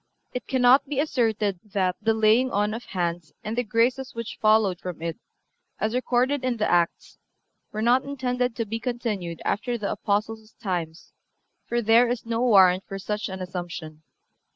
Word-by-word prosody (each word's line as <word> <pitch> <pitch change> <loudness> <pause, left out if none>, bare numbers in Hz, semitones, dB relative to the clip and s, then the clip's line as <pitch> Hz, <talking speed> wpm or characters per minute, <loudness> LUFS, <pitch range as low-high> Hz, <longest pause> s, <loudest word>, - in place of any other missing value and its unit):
It 250 - -5
cannot 260 +2 +4
be 275 -1 -2
asserted 220 - 0
that 190 -4 -1
the 225 +1 +2
laying 220 +4 +4
on 210 -1 0
of 235 +2 -6
hands 170 -4 -3
and 215 +2 -3
the 245 - +1
graces 240 +4 0
which 230 -1 -6
followed 215 -4 +3
from 180 -3 -6
it, 165 +5 -4 0.6
as 220 +1 0
recorded 255 +2 +1
in 255 -2 0
the 215 - +1
Acts, 175 -1 0 0.5
were 215 +1 -3
not 250 +3 +4
intended 250 -3 -2
to 230 - -2
be 225 +2 -4
continued 220 -8 -3
after 240 +3 -1
the 205 -3 -3
Apostles' 215 +2 -2
times, 175 -6 -5 0.5
for 240 0 0
there 230 +3 +5
is 245 -1 -2
no 230 0 -1
warrant 190 -6 +5
for 195 - -5
such 210 +2 -3
an 190 0 -5
assumption. 175 -4 -6
220 Hz, 170 wpm, -25 LUFS, 190-245 Hz, 0.6 s, there